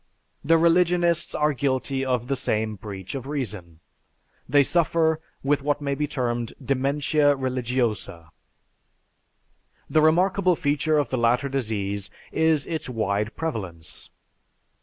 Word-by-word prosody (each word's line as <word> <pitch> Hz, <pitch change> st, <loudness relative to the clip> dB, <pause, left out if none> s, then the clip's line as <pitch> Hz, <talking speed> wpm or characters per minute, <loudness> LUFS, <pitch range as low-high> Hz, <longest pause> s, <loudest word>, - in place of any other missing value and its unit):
The 165 Hz, +3 st, +4 dB
religionists 170 Hz, 0 st, +2 dB
are 150 Hz, 0 st, +2 dB
guilty 135 Hz, 0 st, -1 dB
of 125 Hz, -3 st, 0 dB
the 135 Hz, -, 0 dB
same 110 Hz, -3 st, -1 dB
breach 95 Hz, -2 st, -8 dB
of 135 Hz, -1 st, -5 dB
reason. 105 Hz, -, -5 dB, 0.7 s
They 145 Hz, -1 st, +5 dB
suffer 160 Hz, 0 st, +2 dB, 0.2 s
with 145 Hz, +1 st, +2 dB
what 145 Hz, +1 st, 0 dB
may 140 Hz, -1 st, -2 dB
be 150 Hz, +2 st, -1 dB
termed, 120 Hz, -5 st, -2 dB
"dementia 145 Hz, +2 st, +1 dB
religiosa." 120 Hz, -, -2 dB, 1.6 s
The 155 Hz, -, +3 dB
remarkable 180 Hz, +3 st, +3 dB
feature 150 Hz, +1 st, +1 dB
of 145 Hz, -5 st, 0 dB
the 130 Hz, -, 0 dB
latter 120 Hz, +4 st, +2 dB
disease 100 Hz, -6 st, -2 dB, 0.2 s
is 160 Hz, -2 st, +2 dB
its 160 Hz, -5 st, -4 dB
wide 105 Hz, -2 st, -1 dB
prevalence. 90 Hz, -, -5 dB
135 Hz, 120 wpm, -24 LUFS, 115-155 Hz, 1.6 s, They